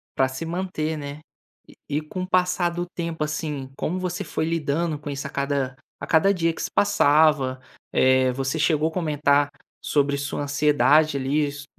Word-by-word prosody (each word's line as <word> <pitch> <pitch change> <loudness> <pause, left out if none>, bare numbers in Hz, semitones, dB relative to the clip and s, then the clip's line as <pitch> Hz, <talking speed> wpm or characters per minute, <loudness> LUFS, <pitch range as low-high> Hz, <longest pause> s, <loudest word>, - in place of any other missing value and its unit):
Pra 130 - +3
se 130 +5 -6
manter, 165 -2 -3
né. 145 0 -7 0.5
E - - -17
e 145 +2 0
com 180 +4 -5
o - - -5
passar 180 -1 +2
do 175 +1 -3
tempo, 170 -3 -4
assim, 150 -3 -4
como 180 +3 -2
você 180 +2 -3
foi 155 -1 -2
lidando 160 0 -1
com 145 - -7
isso, 140 0 -4
a - - -8
cada 140 -2 -2 0.2
a - - -6
cada 180 +5 +4
dia 165 -3 0
que - - -7
se - - -2
passava? 145 -7 +3 0.3
Eh, 130 0 +4
você 135 +4 -2
chegou 155 0 +2
comentar 145 -4 +2 0.3
sobre 140 -1 +1
sua 145 +1 -3
ansiedade, 150 +1 +3
ali, 145 +3 +1
isso 145 0 -7
150 Hz, 180 wpm, -24 LUFS, 140-165 Hz, 0.5 s, cada